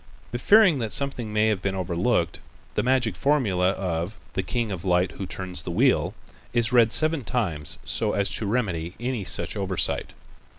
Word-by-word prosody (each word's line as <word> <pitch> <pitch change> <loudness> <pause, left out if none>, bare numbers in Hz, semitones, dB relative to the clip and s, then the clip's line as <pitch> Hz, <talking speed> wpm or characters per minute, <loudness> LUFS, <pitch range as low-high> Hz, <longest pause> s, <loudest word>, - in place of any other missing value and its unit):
But 120 +1 -4
fearing 200 -9 +6
that 110 -3 -3
something 130 -6 -2
may 105 +1 +2
have 105 -3 0
been 95 -1 -1
overlooked, 90 0 0 0.3
the - - +1
magic 125 -5 +1
formula 100 - +2
of 90 0 -2 0.2
"the - - 0
king 115 +3 -2
of 90 -3 -5
light 90 0 +2
who 95 - -6
turns 90 -4 -4
the 90 - -7
wheel" 95 - +2 0.4
is 120 0 +1
read 115 -2 +5
seven 155 0 +2
times 90 -11 -1
so - - +1
as 100 -1 0
to 110 - 0
remedy 95 -7 -1 0.3
such - - 0
oversight. 95 -3 -1
100 Hz, 170 wpm, -25 LUFS, 90-120 Hz, 0.4 s, fearing